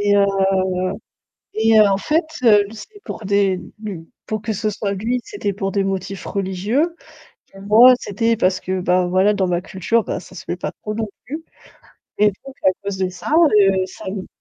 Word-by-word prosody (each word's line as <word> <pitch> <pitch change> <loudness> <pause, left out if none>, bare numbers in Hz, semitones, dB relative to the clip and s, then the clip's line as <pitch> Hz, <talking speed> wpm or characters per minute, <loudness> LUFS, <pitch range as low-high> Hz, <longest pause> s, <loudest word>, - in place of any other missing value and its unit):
Et 205 0 +3
heu, 200 - +5 1.3
et 220 0 +5
en 200 -2 +4
fait, 315 - +1 0.2
heu, 210 -3 +6
c'est 410 - -12
pour 220 - -7
des 200 -1 +2 0.2
b 195 -7 -7 0.2
pour 215 -1 -3
que 220 0 -2
ce 215 +1 -1
soit 200 0 -3
lui, 230 +6 -1
c'était 205 0 -3
pour 195 0 -3
des 200 0 +1
motifs 195 0 -4
religieux, 205 - -1 0.6
et 195 - -12
moi, 225 +6 +7
c'était 225 +3 0
parce 185 -3 +1
que, 185 0 -2
bah 180 0 +2
voilà, 190 +3 +3
dans 190 -2 0
ma 175 0 0
culture, 190 +5 0
bah, - - -3
ça - - -15
se 170 - -9
fait 175 - -3
pas - - -4
trop 215 - -4
non 220 0 -2 0.2
plus, 305 +7 -6 0.7
et 210 - +5 0.2
donc 270 -1 -10
à 190 - +6
cause 200 -1 -3
de 185 - 0
ça, 180 +10 -6 0.3
heu, 195 -1 +3
ça 185 - -12
n 190 0 -5
200 Hz, 195 wpm, -20 LUFS, 190-220 Hz, 1.3 s, moi